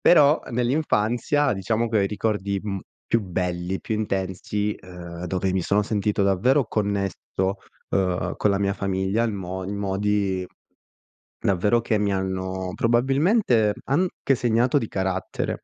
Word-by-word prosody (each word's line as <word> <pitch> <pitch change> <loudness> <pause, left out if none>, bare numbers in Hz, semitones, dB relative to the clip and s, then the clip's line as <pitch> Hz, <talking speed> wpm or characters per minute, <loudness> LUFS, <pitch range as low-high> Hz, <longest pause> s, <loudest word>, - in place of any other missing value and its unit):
Però 150 -3 +6
nell'infanzia 125 +2 +1
diciamo 110 +4 0
che 110 - 0
ho - - +3
i - - +2
ricordi, 100 -2 -1
mhmm, 100 -3 -3 0.3
più 115 - +2
belli, 90 0 -2
più 110 - -3
intensi, 100 0 -2
uhm, 90 -1 -8
dove 95 +1 -1
mi 95 -2 0
sono 100 +4 +2
sentito 105 -1 0
davvero 115 +7 +3
connesso, 100 -3 -1 0.8
uhm, 90 -2 0
con 105 - +2
la 100 - +1
mia 100 0 +1
famiglia 95 +3 0
il 115 - 0
mo 95 -1 -5
in 100 +2 -4
modi, 100 -1 0 0.9
davvero, 105 +5 +2
che 110 -2 0
mi 100 -1 +1
hanno 95 -1 -2
probabilmente 125 - +3
anche 145 0 +1
segnato 120 +3 +2
di 115 - -3
carattere, 95 -1 -2
100 Hz, 140 wpm, -24 LUFS, 95-115 Hz, 0.9 s, Però